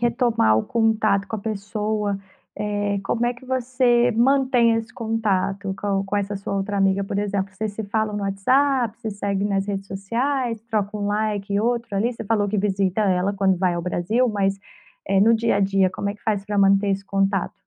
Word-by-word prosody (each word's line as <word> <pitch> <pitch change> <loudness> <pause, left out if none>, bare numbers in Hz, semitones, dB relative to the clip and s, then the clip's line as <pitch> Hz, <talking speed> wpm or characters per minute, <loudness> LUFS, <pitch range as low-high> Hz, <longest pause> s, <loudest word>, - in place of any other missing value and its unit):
retomar 235 - +2
o - - 0
contato 215 -3 +1
com 220 - -3
a - - -6
pessoa, 210 0 -2 0.4
eh, 205 -1 -1
como 240 +3 0
é 245 - 0
que 255 +2 -16
você 250 -1 +2
mantém 250 -1 +3
esse 225 0 -4
contato 200 -3 -1
com 195 -1 0
com 195 +1 -3
essa 200 0 -2
sua 200 0 -4
outra 200 +1 -2
amiga? 195 0 +2
Por 200 0 -3
exemplo, 200 -1 -2
vocês 215 +1 -3
se 220 - -4
falam 215 0 -1
no 205 - -3
WhatsApp, 240 +4 +1
se 220 - -3
seguem 200 0 -2
nas 195 0 0
redes 195 -1 -3
sociais, 230 +5 -2
troca 215 -2 -2
um 205 -1 -2
"like" 205 -1 -1
e 200 - +2
outro 235 -2 -1
ali. 220 +5 +1
Você 225 - -8
falou 205 -1 +1
que 210 - -1
visita 195 0 0
ela 190 0 +1
quando 190 -2 +2
vai 180 -2 +1
ao 170 - -3
Brasil, 185 +8 0
mas, 195 -3 0 0.5
eh, 195 0 +2
no 230 +3 +5
dia 225 -2 +1
a - - +1
dia, 195 -1 +2
como 200 - -3
é 200 - -3
que - - -21
faz 205 -3 0
pra 205 -1 -2
manter 195 +1 +4
esse 195 0 -1
contato? 195 -1 0
205 Hz, 205 wpm, -23 LUFS, 195-225 Hz, 0.5 s, no